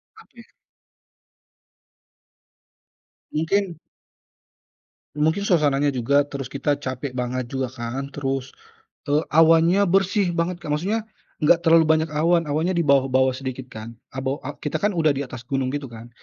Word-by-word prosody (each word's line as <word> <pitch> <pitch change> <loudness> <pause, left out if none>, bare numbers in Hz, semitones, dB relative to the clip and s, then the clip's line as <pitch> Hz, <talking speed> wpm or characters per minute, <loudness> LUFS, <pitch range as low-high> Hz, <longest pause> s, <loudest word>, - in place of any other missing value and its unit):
Apa - - -18
ya - - -14 2.8
mungkin 170 +2 -1 1.4
mungkin 160 +6 +1
suasananya 145 -5 +2
juga, 140 +4 +2
terus 135 -3 -6
kita 145 +1 0
capek 130 -1 -5
banget 125 0 -2
juga 130 0 -3
kan. 130 +3 -5
Terus, 135 -2 -3 0.6
eee, 150 +2 +2
awannya 165 +5 +5
bersih 190 -1 +2
banget, 170 +1 -1
Kak. - - -8
Maksudnya 210 +8 -1 0.4
nggak 165 +3 +5
terlalu 165 -1 +5
banyak 160 0 +2
awan, 165 +3 +2
awannya 160 +6 0
di 170 - +2
bawah-bawah 130 -2 +3
sedikit 130 -1 -6
kan. 110 0 -9 0.2
Abe 130 +1 -1
a 145 +2 -7
kita 150 - -3
kan 205 - +3
udah 155 -2 +3
di 140 - -3
atas 125 -2 -9
gunung 135 0 -1
gitu 145 +1 -4
kan, 115 -1 -11
145 Hz, 140 wpm, -23 LUFS, 130-165 Hz, 2.8 s, awannya